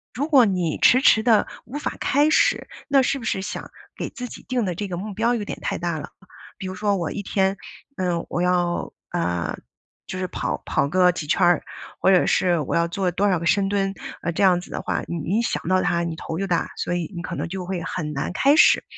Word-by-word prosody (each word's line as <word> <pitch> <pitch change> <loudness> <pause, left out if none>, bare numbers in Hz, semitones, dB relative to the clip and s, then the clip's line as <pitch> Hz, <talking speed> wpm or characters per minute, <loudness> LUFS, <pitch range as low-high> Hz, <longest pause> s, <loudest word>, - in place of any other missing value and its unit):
如 285 +5 -1
果 270 -7 +6
你 180 -5 -1
迟 255 +2 +6
迟 220 - +6
地 220 -3 +4 0.2
无 265 +5 -6
法 - - -3
开 290 +3 +3
始， - - +3 0.2
那 275 -2 +4
是 275 - 0
不 230 - -8
是 190 -3 -1
想 - - -6 0.3
给 - - -4
自 250 0 -7
己 - - -11
定 250 -4 0
的 180 - -1
这 205 +4 -4
个 175 - -4
目 205 +3 -5
标 230 +4 +1
有 210 -3 -3
点 - - -6
太 - - -2
大 170 -2 -2
了。 - - -8 0.5
比 190 - -7
如 185 - -4
说 205 +1 0
我 170 -3 -2
一 205 - -4
天， 195 0 +1 0.4
呃， 175 -2 -1
我 175 - -1
要 175 -1 0 0.2
呃， 85 - -1 0.5
就 185 - -5
是 185 - -2
跑 - - -3
跑 140 - +1
个 180 +1 +4
几 165 -3 -5
圈 150 - 0
儿， 175 -2 +3 0.4
或 190 - +5
者 185 - +5
是 175 -3 +2
我 145 - -2
要 170 0 +3
做 185 +1 -1
多 200 +3 +1
少 180 -3 +2
个 170 - -5
深 195 +2 +2
蹲， 195 -1 0 0.3
啊， 170 - -2
这 180 - 0
样 180 -2 +5
子 180 - -11
的 - - -3
话， - - -2
你 170 - -3 0.2
一 - - +2
想 235 - -2
到 185 0 +3
它 170 -2 +1
你 170 -1 -3
头 160 - -5
就 195 - -1
大， 175 -3 0
所 - - -2
以 175 +1 -3
你 170 - -4
可 - - -5
能 - - -2
就 185 +1 -5
会 180 -2 -3
很 160 -4 -4
难 150 +4 -3
开 280 +7 +4
始。 - - +6
185 Hz, 265 characters per minute, -23 LUFS, 175-210 Hz, 0.5 s, 果